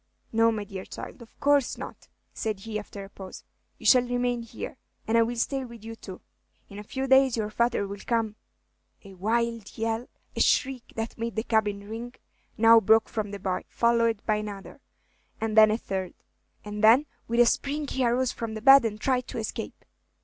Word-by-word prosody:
"No, 225 0 +4
my 215 -2 -3
dear 195 -2 -7
child, - - -9
of 230 - -16
course 285 -2 +2
not," - - -9 0.3
said 215 -3 -3
he, 215 0 -4
after 205 -1 -9
a 195 - -11
pause. 190 -1 -10 0.3
"You - - -13
shall 255 - +7
remain 245 0 -1
here, 230 - -8 0.3
and 220 - +1
I 230 - +6
will 235 +1 0
stay 265 +3 -1
with 235 -3 -11
you 225 0 -7
too. 190 -4 -10 0.5
In 200 - -9
a - - -7
few 265 +5 -4
days 265 -2 +4
your 215 -1 -2
father 235 -2 +1
will 200 0 -7
come 225 -3 0 0.3
" - - -42
A 195 - -11
wild 230 +3 -2
yell, 225 +1 -2 0.3
a - - -3
shriek 265 -3 +1
that 225 +1 -5
made 230 0 -3
the 220 - -1
cabin 210 -3 0
ring, 235 +3 -7 0.4
now 230 +1 +7
broke 220 +1 +4
from 215 -2 -3
the 200 - -6
boy, 190 -1 -2
followed 230 -2 +1
by 215 -1 +2
another, 205 -2 -7 0.6
and 220 -1 -2
then 215 -1 +8
a 215 - +1
third; 190 -5 -4 0.5
and 210 +1 -5
then 235 +7 +7 0.2
with 235 +1 0
a 240 - +8
spring 285 +5 0
he 265 -1 -1
arose 245 +1 +2
from 225 -2 -5
the 220 - -6
bed, 270 0 +9
and 215 -1 -3
tried 255 +1 0
to - - -6
escape. 220 -2 -5
225 Hz, 200 wpm, -27 LUFS, 210-240 Hz, 0.6 s, bed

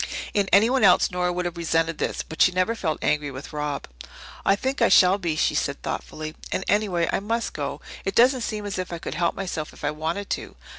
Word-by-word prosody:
In 200 -2 +1
anyone 230 +7 +4
else - - +5
Nora 180 0 0
would 180 0 -2
have 175 0 -4
resented 165 -1 0
this. - - -2
But 160 - -6
she 185 - +6
never 185 +5 +1
felt 165 -9 -2
angry 150 -1 +1
with 135 +3 -9
Rob. 150 -1 -3 0.6
"I 195 - +4
think 265 +5 -2
I 230 - +5
shall 185 +1 +6
be," 170 -4 -1
she - - +2
said - - -1
thoughtfully. 155 0 -5 0.2
"And, 190 - -1
anyway, 195 -5 +1
I - - +2
must 230 +4 -2
go. - - -4 0.2
It 195 - -3
doesn't 255 +2 +5
seem 215 -2 -3
as 200 -2 -3
if 185 - -4
I 170 - -3
could - - -6
help 170 +2 0
myself 175 -5 -4
if - - -15
I 145 - +1
wanted 160 +6 -3
to. - - -4
180 Hz, 230 wpm, -24 LUFS, 160-205 Hz, 0.6 s, she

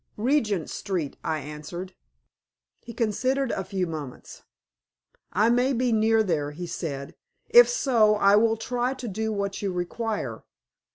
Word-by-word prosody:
"Regent 215 - +1
Street," 180 -8 -3
I 155 -1 -1
answered. 150 +6 -7 0.9
He 235 - -10
considered 255 +4 0
a 190 - -2
few 190 0 -2
moments. 155 -6 -8 0.9
"I 220 +3 +3
may 250 +3 +2
be 250 0 +1
near 220 0 +3
there," 155 -7 -1
he 165 +4 -7
said. 145 -5 -5 0.4
"If 485 +1 +8
so 235 - +3
I 200 -1 +5
will 225 +1 +3
try 245 +3 -2
to 250 -2 -7
do 220 +2 -2
what 200 -1 -3
you 200 -2 -1
require. 205 +5 -3
210 Hz, 145 wpm, -26 LUFS, 175-235 Hz, 0.9 s, If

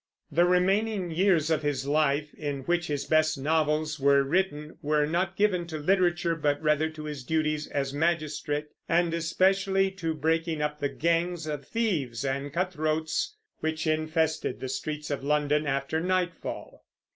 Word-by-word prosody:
The 175 +1 +4
remaining 190 +1 +2
years 165 -2 +2
of 155 -1 +2
his 145 -3 -1
life, 150 0 +1
in 145 -2 -4
which 175 +4 0
his 145 -2 -2
best 155 +1 +2
novels 155 +1 0
were 140 0 +4
written, 155 0 -1
were 150 -1 +2
not 175 +4 -1
given 185 -4 +1
to 160 -2 -5
literature, 175 0 +2
but 145 -2 0
rather 155 0 +2
to 155 -1 -9
his 150 -3 -6
duties 155 +1 0
as 135 -1 -2
magistrate, 150 -1 -1 0.2
and 170 0 +2
especially 190 +3 +2
to 165 -4 -3
breaking 160 +1 0
up 150 0 -2
the 140 - 0
gangs 170 +1 0
of 150 -3 -5
thieves 150 - -1
and 140 +1 -2
cutthroats 160 - -1 0.2
which 160 0 -2
infested 155 -2 0
the 130 - -5
streets 150 +2 -4
of 140 -1 -3
London 150 +1 +1
after 140 +3 -1
nightfall. 180 -2 -3
155 Hz, 155 wpm, -28 LUFS, 150-175 Hz, 0.2 s, The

